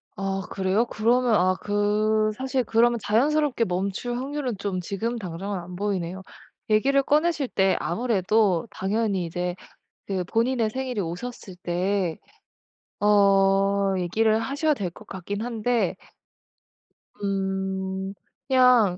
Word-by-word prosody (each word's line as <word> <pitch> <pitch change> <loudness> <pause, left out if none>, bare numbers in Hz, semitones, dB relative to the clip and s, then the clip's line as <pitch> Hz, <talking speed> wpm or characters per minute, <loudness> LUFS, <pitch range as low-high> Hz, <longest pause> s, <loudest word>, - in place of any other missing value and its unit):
아 195 0 -2
그래요? 195 +4 +1
그러면 240 +1 +2
아 185 0 +3
그 215 +1 +1
사실 265 0 -1
그러면 235 +1 +3
자연스럽게 275 +2 +2
멈출 195 +7 -2
확률은 265 -4 -3
좀 195 -2 -2
지금 225 +6 -3
당장은 190 +1 -4
안 180 +1 -9
보이네요. 190 -2 -2 0.5
얘기를 270 +6 +4
꺼내실 305 -1 +2
때 190 -4 +2
아무래도 210 -2 +1
당연히 200 -2 -1
이제 175 +1 -3 0.5
그 190 -2 -2
본인의 230 +2 +1
생일이 255 -2 -3
오셨을 185 +2 -6
때 180 0 0 0.8
어 195 -1 +4
얘기를 215 +5 +2
하셔야 285 +7 0
될 205 -10 -2
것 - - -15
같긴 200 +2 -5
한데 235 0 0 1.3
음. 190 -1 -2 0.3
그냥 250 -8 +5
205 Hz, 245 characters per minute, -25 LUFS, 190-240 Hz, 1.3 s, 그냥